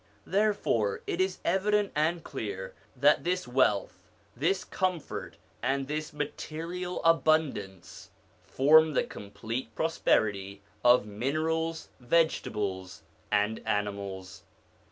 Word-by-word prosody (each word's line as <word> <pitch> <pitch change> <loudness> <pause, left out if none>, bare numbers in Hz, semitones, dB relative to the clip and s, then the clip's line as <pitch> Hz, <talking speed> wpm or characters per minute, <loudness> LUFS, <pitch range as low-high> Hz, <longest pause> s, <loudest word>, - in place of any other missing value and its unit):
Therefore 195 - +1
it 175 - -1
is 190 0 0
evident 205 +1 +2
and 160 +2 +1
clear 100 -8 -5 0.2
that 145 +3 +4
this 180 -4 -1
wealth, 125 -6 +1 0.3
this 175 +9 0
comfort, 185 -5 -3 0.2
and 135 +2 0
this 155 +1 -3
material 165 +4 -5
abundance, 155 - +1 0.3
form 155 +3 +5
the - - +3
complete 115 +3 -6
prosperity 100 -11 0 0.2
of 120 -3 +6
minerals, 160 +9 -2
vegetables, 105 - 0 0.3
and 105 +1 +1
animals. 100 -2 -3
140 Hz, 95 wpm, -29 LUFS, 105-165 Hz, 0.3 s, of